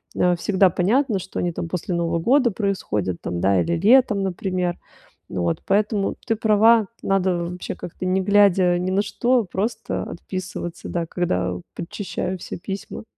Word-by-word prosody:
э, 180 0 +3
всегда 190 +2 +3
понятно, 210 - +1
что 190 +1 -6
они 175 - 0
там 165 - -4
после 180 +1 -3
Нового 170 0 0
года 250 - +3
происходят, 145 - -2
там, 85 - -3
да, 95 0 +3
или 170 - 0
летом, 210 +1 +4
например. 180 -1 -2 0.5
Вот, 85 -2 -1
поэтому 205 0 +1
ты 225 - +1
права, 220 0 +4 0.2
надо 190 -2 +1
вообще 180 +1 -5
как-то 175 - -8
не 185 +1 +2
глядя 190 -3 +4
ни 180 +1 -1
на 195 +2 +2
что, 245 +2 +1
просто 195 +6 -3
отписываться, 185 -2 -6
да, 170 -1 -2
когда 90 - -1 0.2
подчищаю 180 +1 -4
все - - -6
письма. 195 +5 -6
185 Hz, 155 wpm, -22 LUFS, 175-205 Hz, 0.5 s, летом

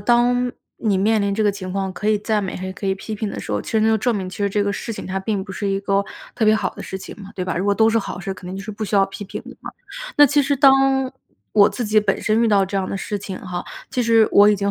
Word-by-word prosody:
当 245 +3 +2 0.3
你 210 -4 +1
面 215 +3 +2
临 200 0 0
这 215 +1 0
个 205 - +3
情 190 -2 -6
况， 190 0 -2
可 210 +3 -3
以 215 -1 +3
赞 210 0 0
美 190 - -4
还 185 - -5
是 185 - -5
可 195 - -6
以 190 - +1
批 215 +3 -6
评 215 0 -3
的 - - -6
时 - - -5
候。 105 - 0
其 - - -8
实 220 - +3
那 220 - +3
就 220 0 +3
证 240 +3 +1
明， 190 -2 -4
其 185 - -9
实 200 -1 +1
这 205 +1 0
个 200 - 0
事 230 - -5
情 - - -7
它 190 0 -2
并 195 -1 -2
不 190 - -8
是 200 +2 -3
一 195 0 0
个 200 0 +1 0.3
特 230 - 0
别 215 - +6
好 205 -4 -1
的 - - -8
事 190 - -6
情 190 - -9
嘛， 195 - -10
对 185 - -3
吧？ 185 -2 -2
如 180 - -1
果 200 - +3
都 220 +2 +4
是 225 - +2
好 200 - -5
事， 195 +1 -4
肯 185 -1 -10
定 185 - -5
就 195 - -6
是 215 - -6
不 215 +1 -7
需 210 - -2
要 195 - +5
批 195 - -8
评 190 - -7
的 - - -11
嘛。 - - -7 0.5
那 290 - +8
其 290 +1 +3
实 280 +1 +1
当 270 -1 +4 0.4
我 205 -2 +6
自 245 - -4
己 215 0 +3
本 205 -2 0
身 220 +1 +2
遇 230 - +3
到 200 -2 +4
这 190 - -8
样 190 -1 -1
的 - - -3
事 205 +1 -3
情 195 -1 -6
哈， 180 -2 -5 0.3
其 250 - 0
实 225 -1 +5
我 205 +1 +7
已 210 - +4
经 200 0 0
205 Hz, 355 characters per minute, -21 LUFS, 195-220 Hz, 0.5 s, 那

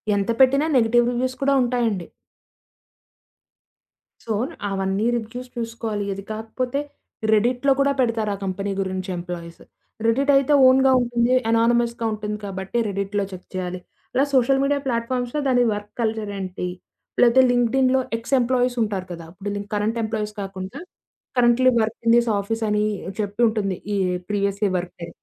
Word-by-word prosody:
ఎంత 200 +2 -1
పెట్టినా 275 +3 +5
negative 240 0 +3
reviews 255 +1 -1
కూడా 280 0 +3
ఉంటాయండి. 235 -7 0 2.2
సో, 225 - -2 0.4
అవన్నీ 195 +2 -1
రివ్యూస్ 245 +3 -7
జూసుకోవాలి. 230 -3 -3
ఇది 195 0 -8
కాకపోతే, 245 +5 -3 0.5
రెడిట్‌లో 245 +5 +2
కూడా 280 0 +3
పెడతారు. 230 -4 +1
ఆ - - -9
కంపెనీ 195 +1 -3
గురించి 190 0 -3
ఎంప్లాయీస్. 170 -1 -7 0.4
రెడిటయితే 275 +4 +3
ఓన్‌గా 265 +1 +5
ఉంటుంది. 240 0 +1 0.2
అనానిమస్‌గా 235 0 +2
ఉంటుంది. 210 0 -4
కాబట్టి 190 +3 -4
రెడిట్‌లో 200 +1 -2
చెక్ 185 -1 -10
చేయాలి. 185 0 -3 0.4
ఇలా 270 - +4
సోషల్ 270 +1 +4
మీడియా 285 +1 +1
ప్లాట్ 235 -1 -1
ఫామ్స్‌లో 250 +3 -1
దాని 250 -2 +4
వర్క్ 205 0 -7
కల్చరేంటి? 205 -5 -3 0.5
లేకతే 245 +2 +6
లింకడిన్‌లో 255 +2 +3 0.2
ఎక్స్ 230 +4 -6
ఎంప్లాయీసుంటారు 240 -6 0
గదా! 165 -1 -9
ఇప్పుడు 200 +1 -4
కరెంట్ 210 +3 0
ఎంప్లాయీస్ 215 -1 -3
కాకుండా, 190 0 -6 0.6
కరెంట్‌లీ 245 +1 +5
వర్క్ 220 +1 -2
ఇన్ 230 - +6
థిస్ 235 0 +2
ఆఫీసని, 210 0 0 0.3
జెప్పుంటుంది. 205 -2 0 0.2
ఈ - - +1 0.3
ప్రీవియస్‌లి 200 0 0
వర్కుని 175 -1 -6
225 Hz, 130 wpm, -23 LUFS, 200-245 Hz, 2.2 s, లేకతే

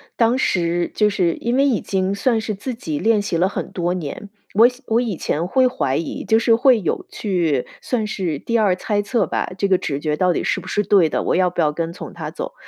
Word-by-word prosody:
当 235 +2 +3
时 175 -6 0
就 210 -1 +3
是 180 -4 +1
因 235 +1 -2
为 275 +2 +4
已 255 -7 +1
经 190 0 -1
算 225 +3 +1
是 220 0 -3
自 240 +6 -5
己 155 -10 -4
练 220 -1 +2
习 170 -4 -2
了 185 +3 +3
很 - - -5
多 175 0 -1
年， 180 +3 -6 0.3
我 225 +3 +7 0.2
我 225 +2 +2
以 230 -6 -2
前 165 +3 -2
会 255 +6 +3
怀 135 - -1
疑， 165 - -4
就 220 - +4
是 230 0 +4
会 245 -1 +4
有 170 - -2
去 170 - -1 0.2
算 235 -4 -1
是 180 -7 -2
第 230 +8 -1
二 200 -4 +3
猜 205 +2 -1
测 210 0 0
吧， - - -2
这 200 - +1
个 190 -1 +4
直 140 -5 -3
觉 150 0 -1
到 180 0 +2
底 - - -2
是 - - 0
不 185 - -11
是 205 +2 0
对 185 -5 +4
的， - - -1
我 - - +1
要 180 0 +3
不 - - -2
要 150 - +2
跟 165 +2 -3
从 - - -9
它 - - -6
走。 - - -6
195 Hz, 265 characters per minute, -20 LUFS, 170-225 Hz, 0.3 s, 我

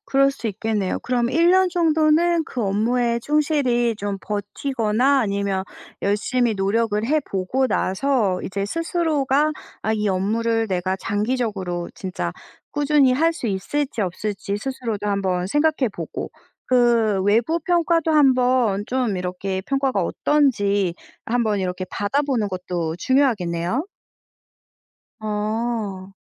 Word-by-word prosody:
그럴 275 -5 +3
수 255 -4 -6
있겠네요. 210 -1 -1
그럼 245 -1 0
1 335 +4 +4
년 375 0 +4
정도는 325 0 +3
그 250 -7 -4
업무에 235 +4 +1
충실히 280 -5 +1
좀 200 -1 -3
버티거나 225 +5 0
아니면 200 -2 -1 0.4
열심히 225 +4 +1
노력을 210 +2 0
해 300 +5 +2
보고 250 +4 -1
나서 210 -4 0
이제 195 +1 -3
스스로가 305 - +1 0.3
아 220 - 0
이 210 -1 0
업무를 225 +4 0
내가 185 0 -1
장기적으로 205 -5 -2
진짜 180 - -4 0.4
꾸준히 290 -3 +3
할 325 +5 +2
수 255 - -5
있을지 260 +7 -2
없을지 200 +1 -3
스스로도 225 -3 -4
한번 185 -3 0
생각해 295 +2 +2
보고 - - -6 0.4
그 235 -5 +3
외부 230 - +2
평가도 335 -1 +1
한번 250 -7 +3
좀 250 -6 0
이렇게 185 +1 -3
평가가 270 -3 0
어떤지 205 - +1 0.3
한번 225 -3 0
이렇게 185 0 -3
받아보는 245 0 0
것도 180 -3 -3
중요하겠네요. 230 - +1 1.3
어. 210 -2 -3
225 Hz, 265 characters per minute, -22 LUFS, 200-275 Hz, 1.3 s, 1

